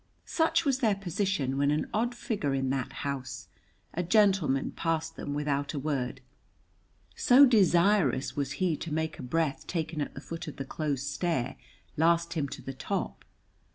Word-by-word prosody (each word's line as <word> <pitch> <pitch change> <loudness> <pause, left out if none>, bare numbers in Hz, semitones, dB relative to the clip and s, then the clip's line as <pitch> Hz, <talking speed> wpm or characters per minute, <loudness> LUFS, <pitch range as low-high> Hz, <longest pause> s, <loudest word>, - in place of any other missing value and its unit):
Such 325 0 +2
was 270 -2 +2
their 220 -6 +3
position 185 -8 -1
when 140 0 +3
an 150 +1 0
odd 240 +3 0
figure 195 - -1
in 135 -1 0
that 135 -1 -2
house, 135 -1 -5 0.4
a 175 - -1
gentleman, 180 -8 +3
passed 165 -1 -2
them 145 - -4
without 145 0 -1
a - - -1
word, 135 -2 -2 0.9
so 265 +2 +7
desirous 195 - +3
was 140 -1 -2
he 180 -4 +1
to 165 - -6
make 160 0 -2
a - - -5
breath 140 +1 -1
taken 160 -2 -2
at 145 - -4
the - - -6
foot 165 +1 -7
of 150 - -6
the 135 - -5
close 140 -2 -2
stair 145 -2 -1 0.4
last 170 +1 +3
him 150 -4 -1
to - - -8
the 135 - -5
top. 130 - -3
155 Hz, 170 wpm, -29 LUFS, 140-190 Hz, 0.9 s, so